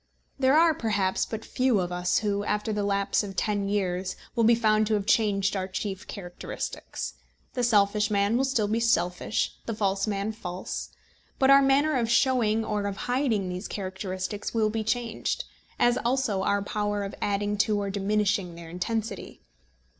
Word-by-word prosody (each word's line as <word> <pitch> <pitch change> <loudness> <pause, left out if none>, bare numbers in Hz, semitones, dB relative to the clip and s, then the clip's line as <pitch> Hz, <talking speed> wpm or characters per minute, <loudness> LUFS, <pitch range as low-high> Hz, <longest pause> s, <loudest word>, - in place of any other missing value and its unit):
There 265 +2 +4
are, 330 0 +6
perhaps, 205 -7 0
but 220 0 -6
few 255 -5 +2
of 180 -1 -2
us 180 0 +1
who, 205 -2 0
after 210 +1 -1
the 210 - -1
lapse 200 0 +1
of 200 -2 -6
ten 205 -1 0
years, 185 -2 -1 0.2
will 230 - +2
be 230 +1 +6
found 215 -2 +3
to 215 - +2
have 205 -2 -1
changed 205 -2 +2
our 190 -1 -2
chief 190 0 -4
characteristics. 175 - -6 0.4
The 250 - -1
selfish 210 -2 +3
man 200 +1 +2
will 265 +2 +2
still 235 -6 +1
be 220 +2 0
selfish, 210 -2 +1
and - - -30
the 225 -2 -3
false 195 -1 0
man 200 0 -1
false. 185 -4 -5 0.5
But 270 0 +5
our 275 0 +8
manner 280 +3 +3
of 230 -2 0
showing 230 -3 +3
or 210 -2 -1
of 200 -1 -4
hiding 245 -6 +1
these 180 +2 -4
characteristics 190 +2 -4
will 215 -1 +2
be 220 0 -2
changed, 230 0 -1 0.3
as 240 0 +3
also 240 -5 0
our 200 +1 +1
power 205 0 -1
of 195 - -5
adding 205 0 0
to 210 0 +2
or 200 -1 -2
diminishing 200 -2 0
their 170 -1 -10
intensity. 210 +3 -4
210 Hz, 175 wpm, -27 LUFS, 195-225 Hz, 0.5 s, our